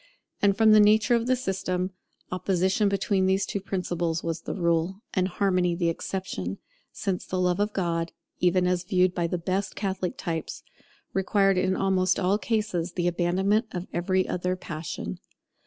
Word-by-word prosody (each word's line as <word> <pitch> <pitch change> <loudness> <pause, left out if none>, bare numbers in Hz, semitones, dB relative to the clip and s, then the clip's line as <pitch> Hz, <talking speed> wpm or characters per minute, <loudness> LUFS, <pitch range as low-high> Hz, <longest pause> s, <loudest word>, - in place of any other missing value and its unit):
And 200 -1 +3
from 220 -1 +6
the 215 - +8
nature 210 +3 +5
of 235 0 +2
the 255 - +4
system, 185 -5 -2 0.4
opposition 190 +3 +1
between 195 -1 +1
these 190 +1 +2
two 200 - -3
principles 175 -4 -2
was 165 -1 -3
the - - -5
rule, 170 +2 0
and 185 -1 +2
harmony 180 -2 +1
the 170 -1 +1
exception; 165 - -4 0.3
since 190 -2 -2
the 185 - -3
Love 180 0 +1
of 205 +1 +1
God, 170 -4 -1 0.3
even 180 0 +3
as 180 -1 +1
viewed 180 0 +2
by 170 -2 0
the 180 - -2
best 190 +3 -2
Catholic 190 -3 -2
types, 165 -2 -4 0.5
required 195 0 +2
in 185 0 +1
almost 185 -1 +2
all 195 +2 +2
cases 190 -4 -1
the 175 -1 -1
abandonment 190 +6 +1
of 180 -1 -4
every 185 +2 +1
other 180 +1 -1
passion. 155 - -6
185 Hz, 165 wpm, -26 LUFS, 175-195 Hz, 0.5 s, the